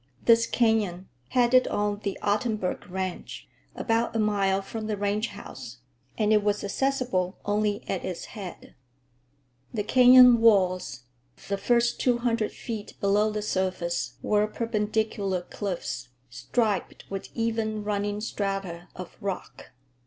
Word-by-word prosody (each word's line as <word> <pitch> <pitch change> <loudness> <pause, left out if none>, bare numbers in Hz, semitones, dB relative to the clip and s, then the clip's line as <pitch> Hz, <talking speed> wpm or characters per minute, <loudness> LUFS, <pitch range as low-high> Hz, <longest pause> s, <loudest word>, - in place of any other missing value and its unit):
This 230 0 +5
canyon 210 -6 +1 0.2
headed 250 +1 +4
on 205 0 -1
the 200 -2 -3
Ottenburg 210 -3 -1
ranch, 185 0 -5 0.3
about 230 0 0
a - - +1
mile 195 -2 +1
from 215 +2 -6
the 215 -1 -2
ranch 205 +2 0
house, 130 - -10 0.4
and 215 -1 +3
it 210 -1 +4
was 205 0 0
accessible 205 -5 -1
only 205 0 0
at 190 - -2
its 180 - -5
head. 195 -5 -9 1.0
The 210 -3 -2
canyon 250 +1 +7
walls, 185 - +3 0.3
for - - -17
the 195 - -2
first 240 +1 +2
two 245 -2 +2
hundred 230 -2 0
feet 220 -3 -7
below 205 +2 +3
the 210 0 -3
surface, 180 -9 -1
were 210 0 +2
perpendicular 215 -3 -1
cliffs, 175 -10 -5 0.2
striped 185 - -1
with 195 -1 -5
even 225 -2 -1
running 205 0 -2
strata 195 -5 -3
of 185 -1 -9
rock. 195 -2 -5
205 Hz, 130 wpm, -27 LUFS, 190-225 Hz, 1.0 s, canyon